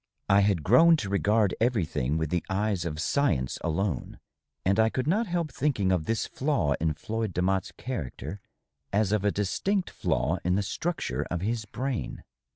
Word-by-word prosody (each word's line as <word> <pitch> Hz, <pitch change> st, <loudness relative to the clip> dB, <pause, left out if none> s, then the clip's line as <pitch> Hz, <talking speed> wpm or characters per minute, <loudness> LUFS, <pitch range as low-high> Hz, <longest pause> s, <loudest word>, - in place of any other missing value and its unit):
I 100 Hz, 0 st, +6 dB
had 100 Hz, -5 st, +2 dB
grown 165 Hz, -, +6 dB
to 105 Hz, -9 st, -4 dB
regard 100 Hz, 0 st, +2 dB
everything 80 Hz, -, +1 dB
with 80 Hz, -2 st, -2 dB
the 90 Hz, -1 st, 0 dB
eyes 100 Hz, -2 st, 0 dB
of 75 Hz, -2 st, -4 dB
science 80 Hz, -, 0 dB
alone, 85 Hz, +3 st, -2 dB, 0.5 s
and 95 Hz, +3 st, +3 dB
I 110 Hz, 0 st, +5 dB
could 130 Hz, +2 st, -2 dB
not 210 Hz, +9 st, +1 dB
help 170 Hz, -4 st, -1 dB
thinking 125 Hz, -9 st, 0 dB
of 90 Hz, -4 st, +1 dB
this 115 Hz, 0 st, 0 dB
flaw 125 Hz, -, 0 dB
in 80 Hz, -2 st, +1 dB
Floyd 110 Hz, +3 st, -3 dB
Demotte's 95 Hz, +1 st, 0 dB
character 100 Hz, -, -5 dB, 0.5 s
as 105 Hz, 0 st, +2 dB
of 105 Hz, -2 st, +1 dB
a 105 Hz, -, +3 dB
distinct 180 Hz, -, -1 dB
flaw 85 Hz, +6 st, 0 dB
in 90 Hz, +1 st, +2 dB
the 100 Hz, -, +1 dB
structure 165 Hz, -, -2 dB
of 85 Hz, -1 st, -2 dB
his 110 Hz, +2 st, -1 dB
brain. 130 Hz, +3 st, -4 dB
100 Hz, 170 wpm, -28 LUFS, 90-120 Hz, 0.5 s, I